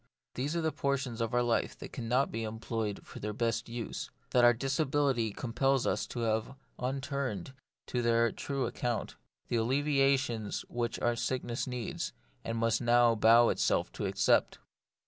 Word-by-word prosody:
These 140 Hz, +6 st, -2 dB
are 170 Hz, -, +1 dB
the 160 Hz, -1 st, +1 dB
portions 135 Hz, -4 st, -1 dB
of 115 Hz, -, -1 dB
our 120 Hz, 0 st, +2 dB
life 120 Hz, -1 st, 0 dB
that -, -, -9 dB
cannot 125 Hz, +3 st, 0 dB
be 115 Hz, -, -3 dB
employed 110 Hz, -1 st, -3 dB
for -, -, -10 dB
their 105 Hz, +1 st, -3 dB
best 115 Hz, +1 st, -1 dB
use; 115 Hz, -1 st, -5 dB, 0.2 s
that 125 Hz, -, +4 dB
our 120 Hz, -, +8 dB
disability 135 Hz, -1 st, +1 dB
compels 130 Hz, +4 st, 0 dB
us -, -, 0 dB
to 120 Hz, -, -4 dB
leave 110 Hz, +4 st, -1 dB, 0.2 s
unturned 130 Hz, -, -3 dB, 0.3 s
to 125 Hz, -, -1 dB
their 115 Hz, -1 st, +3 dB
true 140 Hz, -2 st, -2 dB
account; 120 Hz, -1 st, -2 dB, 0.3 s
the 120 Hz, -, +1 dB
alleviations 135 Hz, -2 st, +1 dB
which 120 Hz, -1 st, -2 dB
our 120 Hz, 0 st, +2 dB
sickness 120 Hz, 0 st, -2 dB
needs, 125 Hz, -3 st, -4 dB, 0.3 s
and 115 Hz, 0 st, -3 dB
must 115 Hz, +1 st, +1 dB
bow 120 Hz, -1 st, +5 dB
itself -, -, +1 dB
to -, -, -3 dB
accept. -, -, +2 dB
120 Hz, 155 wpm, -31 LUFS, 115-135 Hz, 0.3 s, our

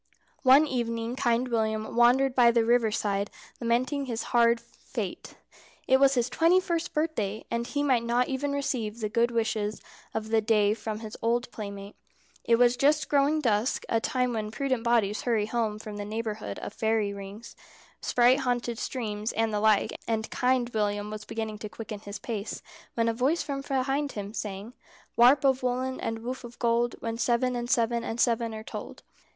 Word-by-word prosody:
One 270 Hz, +3 st, +7 dB
evening 235 Hz, -3 st, -2 dB
Kind 240 Hz, 0 st, +1 dB
William 220 Hz, -2 st, -1 dB
wandered 250 Hz, +3 st, +4 dB
by 245 Hz, -2 st, +6 dB
the 235 Hz, -1 st, +3 dB
river 235 Hz, -1 st, +3 dB
side 200 Hz, -1 st, -1 dB, 0.3 s
lamenting 255 Hz, +4 st, 0 dB
his 230 Hz, -2 st, -3 dB
hard 235 Hz, -1 st, +5 dB
fate. 235 Hz, 0 st, -7 dB, 0.5 s
It 265 Hz, -, +5 dB
was 275 Hz, 0 st, +5 dB
his 240 Hz, -1 st, +2 dB
twenty 335 Hz, +7 st, +4 dB
first 340 Hz, -2 st, -2 dB
birthday, 265 Hz, -10 st, -2 dB
and 235 Hz, 0 st, -1 dB
he 285 Hz, +2 st, -1 dB
might 260 Hz, -5 st, +3 dB
not 240 Hz, +1 st, +1 dB
even 280 Hz, +1 st, -2 dB
receive 240 Hz, -6 st, -2 dB
the 215 Hz, -2 st, -2 dB
good 235 Hz, +2 st, +2 dB
wishes 220 Hz, -2 st, -1 dB, 0.4 s
of 220 Hz, 0 st, -3 dB
the 225 Hz, 0 st, +3 dB
day 210 Hz, -1 st, +3 dB
from 220 Hz, -1 st, -5 dB
his 220 Hz, -1 st, -7 dB
old 240 Hz, +2 st, 0 dB
playmate. 200 Hz, -1 st, -7 dB, 0.5 s
It 235 Hz, -, +4 dB
was 245 Hz, +1 st, +4 dB
just 295 Hz, +3 st, +2 dB
growing 290 Hz, +2 st, +3 dB
dusk, 225 Hz, -1 st, +1 dB
a 225 Hz, -, +2 dB
time 250 Hz, 0 st, 0 dB
when 215 Hz, -2 st, -2 dB
prudent 260 Hz, 0 st, -1 dB
bodies 225 Hz, -3 st, +2 dB
hurry 225 Hz, -4 st, +1 dB
home 220 Hz, -1 st, -1 dB
from 215 Hz, -1 st, -8 dB
the 205 Hz, -, -4 dB
neighbourhood 210 Hz, -, -4 dB
of -, -, -7 dB
fairy 220 Hz, -2 st, 0 dB
rings, 200 Hz, +3 st, -9 dB, 0.5 s
sprite 250 Hz, +2 st, +4 dB
haunted 245 Hz, -3 st, -1 dB
streams, 215 Hz, -3 st, -3 dB
and 225 Hz, 0 st, 0 dB
the 210 Hz, -, +1 dB
like, 215 Hz, -1 st, +3 dB
and 220 Hz, -1 st, -2 dB
Kind 250 Hz, -1 st, +1 dB
William 210 Hz, -2 st, -1 dB
was 215 Hz, 0 st, -7 dB
beginning 220 Hz, -1 st, -4 dB
to 215 Hz, -, -6 dB
quicken 215 Hz, -1 st, -7 dB
his 205 Hz, 0 st, -7 dB
pace, 210 Hz, 0 st, -5 dB, 0.3 s
when 230 Hz, -1 st, +1 dB
a 230 Hz, -, +2 dB
voice 265 Hz, +9 st, +1 dB
from 275 Hz, -2 st, -4 dB
behind 275 Hz, +1 st, -1 dB
him 205 Hz, 0 st, -6 dB
sang: 205 Hz, +1 st, -5 dB, 0.4 s
"Warp 255 Hz, +4 st, +6 dB
of 265 Hz, -1 st, +3 dB
woollen 255 Hz, +1 st, -1 dB
and 225 Hz, 0 st, -4 dB
woof 255 Hz, +2 st, -5 dB
of 240 Hz, 0 st, -10 dB
gold: 235 Hz, 0 st, +1 dB
When 230 Hz, 0 st, -4 dB
seven 245 Hz, +1 st, +1 dB
and 240 Hz, 0 st, -3 dB
seven 235 Hz, -2 st, +1 dB
and 230 Hz, 0 st, -4 dB
seven 230 Hz, -2 st, +1 dB
are 215 Hz, -, -7 dB
told." -, -, -8 dB
235 Hz, 185 wpm, -28 LUFS, 220-255 Hz, 0.5 s, One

